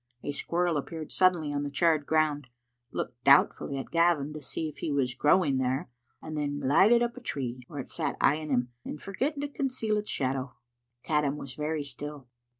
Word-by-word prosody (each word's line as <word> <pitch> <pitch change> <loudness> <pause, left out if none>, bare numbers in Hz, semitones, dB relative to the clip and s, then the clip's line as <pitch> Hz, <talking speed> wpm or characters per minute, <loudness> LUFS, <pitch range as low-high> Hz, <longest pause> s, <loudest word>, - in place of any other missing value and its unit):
A - - -2
squirrel 170 +2 0
appeared 155 +2 -5
suddenly 175 -6 +3
on 145 - -1
the 145 - -3
charred 155 0 +2
ground, 155 -3 +1 0.4
looked 120 0 -5
doubtfully 140 0 +4
at 135 - -6
Gavin 165 -4 +2
to 155 - -7
see 155 +4 -2
if 150 - -9
he 155 - -2
was 135 -3 +1
growing 145 0 +3
there, 130 0 -1 0.3
and 155 -1 -6
then 145 -1 -2
glided 190 - +5
up 240 +1 -2
a - - -8
tree, 125 - -3
where 145 - -5
it - - -9
sat - - -2
eyeing 155 +2 +2
him, 125 -2 +1
and 150 - -6
forgetting 275 - -2
to 290 - -1
conceal 255 -7 -1
its 210 0 -3
shadow. 130 -1 -2 0.5
Caddam 150 -2 +1
was 135 -3 -7
very 150 0 -2
still. 140 0 -7
150 Hz, 190 wpm, -29 LUFS, 140-170 Hz, 0.5 s, glided